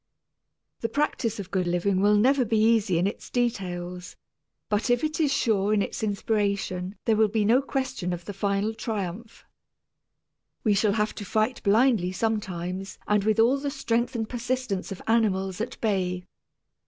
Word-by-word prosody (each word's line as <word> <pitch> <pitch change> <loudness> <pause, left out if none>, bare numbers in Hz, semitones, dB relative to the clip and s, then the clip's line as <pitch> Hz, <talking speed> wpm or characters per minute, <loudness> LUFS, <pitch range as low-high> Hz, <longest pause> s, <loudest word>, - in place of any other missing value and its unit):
The 230 - -2
practice 230 -5 -1
of 195 - -7
good 185 -2 0
living 185 +2 +1
will 205 +1 +5
never 255 +5 +4
be 225 -1 0
easy 215 -4 +3
in 175 - +2
its 200 - -4
details, 180 -7 -3 0.5
but 210 +4 0
if 245 +2 +2
it 310 +1 -1
is 300 -3 +2
sure 215 -6 +2
in 205 - +2
its - - -5
inspiration 200 -3 -1
there 225 - +3
will 220 0 +4
be 210 0 0
no 240 +5 +4
question 260 -9 -3
of 175 -1 -5
the 205 - -5
final 200 +2 0
triumph. 220 -1 -5 1.2
We 215 - +3
shall 200 0 +2
have 210 0 0
to 210 - -7
fight 215 +5 0
blindly 215 -3 +3
sometimes 190 -3 -3
and 210 -1 +2
with 215 +1 +1
all 245 +5 +4
the 285 +1 -2
strength 245 -3 -1
and 225 -2 -2
persistence 245 -5 -3
of 195 - -7
animals 195 -4 +1
at 245 +2 -5
bay. 180 -4 0
210 Hz, 165 wpm, -26 LUFS, 195-230 Hz, 1.2 s, will